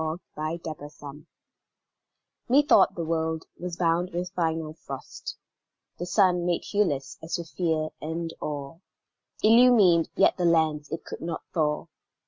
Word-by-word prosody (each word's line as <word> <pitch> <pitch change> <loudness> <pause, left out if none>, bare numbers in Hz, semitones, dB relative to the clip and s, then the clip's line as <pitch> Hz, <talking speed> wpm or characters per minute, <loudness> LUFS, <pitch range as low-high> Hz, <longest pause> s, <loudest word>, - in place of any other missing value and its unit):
WHITE 155 +2 -4
DEATH 155 -2 -5 1.7
Methought 270 -6 +5
the 170 - -3
world 160 0 -1
was 175 -1 -5
bound 175 +1 +1
with 180 0 -4
final 160 -2 -1
frost; 135 -4 -8 0.6
The 175 - -4
sun, 180 -2 +3
made 175 -1 0
hueless 155 -10 -1
as 160 - -3
with 170 -2 -7
fear 160 -3 0
and 165 +1 -4
awe, 145 +1 -5 0.6
Illumined 220 -7 +6
yet - - +4
the 180 - 0
lands 155 -3 +2
it 165 - -5
could - - -8
not 165 0 -4
thaw. 150 -3 0
165 Hz, 130 wpm, -27 LUFS, 155-180 Hz, 1.7 s, Illumined